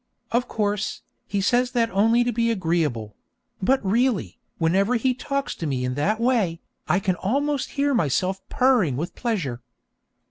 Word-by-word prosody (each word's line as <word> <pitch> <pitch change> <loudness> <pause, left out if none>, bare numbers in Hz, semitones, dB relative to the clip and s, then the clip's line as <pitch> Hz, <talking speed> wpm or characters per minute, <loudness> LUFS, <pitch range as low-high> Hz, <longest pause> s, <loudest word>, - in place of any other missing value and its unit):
Of 240 +2 +1
course, 210 -1 -2 0.2
he 200 -1 -1
says 245 +5 +2
that 230 -2 +1
only 225 +5 +3
to 245 - 0
be 230 0 +1
agreeable; 160 - -1 0.5
but 260 +3 +2
really, 235 +2 +1 0.2
whenever 195 +8 +2
he 255 +2 +2
talks 275 +2 -3
to 165 - -3
me 130 -3 -1
in 125 - -1
that 195 - 0
way, 230 -9 +1 0.3
I 185 - +3
can 190 -1 0
almost 280 +5 -1
hear 285 0 +2
myself 190 - 0
purring 240 - +3
with 165 +5 -4
pleasure. 170 - -2
210 Hz, 155 wpm, -24 LUFS, 170-245 Hz, 0.5 s, only